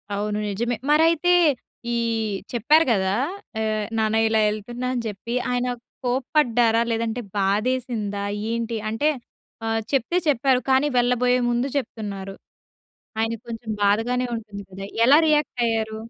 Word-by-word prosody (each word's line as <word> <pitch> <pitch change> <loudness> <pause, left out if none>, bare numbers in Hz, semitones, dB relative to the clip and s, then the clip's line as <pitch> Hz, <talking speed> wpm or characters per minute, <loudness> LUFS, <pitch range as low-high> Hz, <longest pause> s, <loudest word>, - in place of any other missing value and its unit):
అవును. 210 +1 -2
నిజమే. 235 +5 -1 0.2
మరైతే 330 +3 +4 0.6
ఈ - - +1 0.6
చెప్పారు 295 +8 +4
గదా! 190 -3 +1 0.5
ఆహ్, 215 -1 -1
నాన్న 220 0 +1
ఇలా 220 0 +2
ఎళ్తున్నా 240 +4 -4
అని 245 - -1
జెప్పి 220 +3 -4 0.2
ఆయన 245 0 0 0.4
కోప్పడ్డారా? 245 -3 +2
లేదంటే 230 +1 -1 0.2
బాధేసిందా? 210 0 -1 0.3
ఏంటి 230 0 -2
అంటే 225 +8 +1 0.6
ఆహ్, 225 0 0
చెప్తే 275 +5 +1
చెప్పారు 265 -1 +2
కానీ 265 +2 +4
వెళ్ళబోయే 250 +1 +3
ముందు 240 +2 0
చెప్తున్నారు. 200 -6 -5 0.8
ఆయనకి 225 0 -1
కొంచెం 225 0 -7
బాధగానే 225 +5 +2
ఉంటుంది 210 -3 -7
కదా! 195 +1 -7 0.2
ఎలా 275 +4 +7
రియాక్ట్ 300 -4 +1
అయ్యారు? 220 -1 -1
230 Hz, 125 wpm, -23 LUFS, 215-250 Hz, 0.8 s, ఎలా